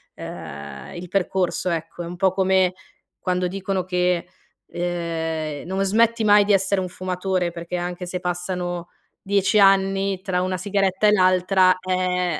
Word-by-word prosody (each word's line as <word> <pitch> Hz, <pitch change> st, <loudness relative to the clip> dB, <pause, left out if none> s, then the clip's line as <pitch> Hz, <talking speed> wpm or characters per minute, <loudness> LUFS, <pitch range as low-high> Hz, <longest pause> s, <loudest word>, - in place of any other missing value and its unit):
ehm, 70 Hz, -4 st, -8 dB
il 175 Hz, +1 st, -7 dB
percorso, 185 Hz, -1 st, 0 dB
ecco. 165 Hz, +1 st, -4 dB
È -, -, -6 dB
un 175 Hz, -, -6 dB
po' 185 Hz, +1 st, +2 dB
come 190 Hz, -1 st, +2 dB, 0.5 s
quando 180 Hz, -1 st, 0 dB
dicono 190 Hz, 0 st, -2 dB
che, 180 Hz, -1 st, 0 dB, 0.4 s
ehm, 165 Hz, -3 st, -3 dB
non 190 Hz, +2 st, -1 dB
smetti 230 Hz, +3 st, +2 dB
mai 205 Hz, -1 st, +6 dB
di 210 Hz, -, +3 dB
essere 195 Hz, 0 st, +2 dB
un 185 Hz, -, -4 dB
fumatore, 180 Hz, 0 st, -2 dB
perché 170 Hz, +1 st, -6 dB
anche 175 Hz, +1 st, -4 dB
se 180 Hz, 0 st, -3 dB
passano 175 Hz, -1 st, -3 dB, 0.3 s
10 200 Hz, +1 st, +2 dB
anni, 195 Hz, -1 st, +3 dB
tra 185 Hz, -2 st, -1 dB
una 185 Hz, 0 st, -1 dB
sigaretta 195 Hz, +1 st, +1 dB
e -, -, +6 dB
l'altra, 185 Hz, -1 st, +4 dB
ehm 180 Hz, -3 st, 0 dB
185 Hz, 150 wpm, -22 LUFS, 175-195 Hz, 0.5 s, mai